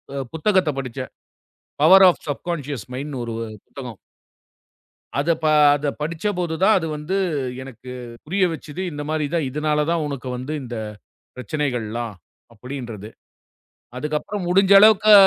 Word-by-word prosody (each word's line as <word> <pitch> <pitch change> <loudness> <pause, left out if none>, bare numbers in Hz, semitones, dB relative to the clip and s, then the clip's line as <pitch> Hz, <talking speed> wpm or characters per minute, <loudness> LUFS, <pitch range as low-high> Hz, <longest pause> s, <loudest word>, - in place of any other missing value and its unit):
அ - - -3 0.2
புத்தகத்தைப் 160 -5 +2
படிச்சேன். 130 0 -5 0.7
Power 190 +4 +9
of - - -2
subconscious 145 - -4
மைண்ட்ன்னு 135 -1 -4
ஒரு 115 - -4 0.3
புத்தகம். 125 -6 -9 1.2
அத 145 +4 0
ப - - +1 0.3
அத 145 0 -2
படிச்சபோது 165 +1 -2
தான் 215 +2 +6
அது 165 -3 -2
வந்து 160 +6 -2 0.5
எனக்குப் 125 -1 -9
புரிய 190 +5 +1
வச்சுது. 155 +2 -7
இந்த 145 -1 -5
மாதிரிதான். 155 0 0
இதனால 150 +1 0
தான் 165 -2 +1
உனக்கு 135 -2 -5
வந்து 135 +5 -5
இந்தப் 110 -4 -6 0.4
பிரச்சனைகள்லாம் 120 -3 -3 0.4
அப்படின்றது. 115 -3 -7 0.9
அதுக்கப்புறம் 150 +7 -3
முடிஞ்ச 195 +2 +4
அளவுக்கு 215 0 +7
145 Hz, 120 wpm, -22 LUFS, 125-170 Hz, 1.2 s, Power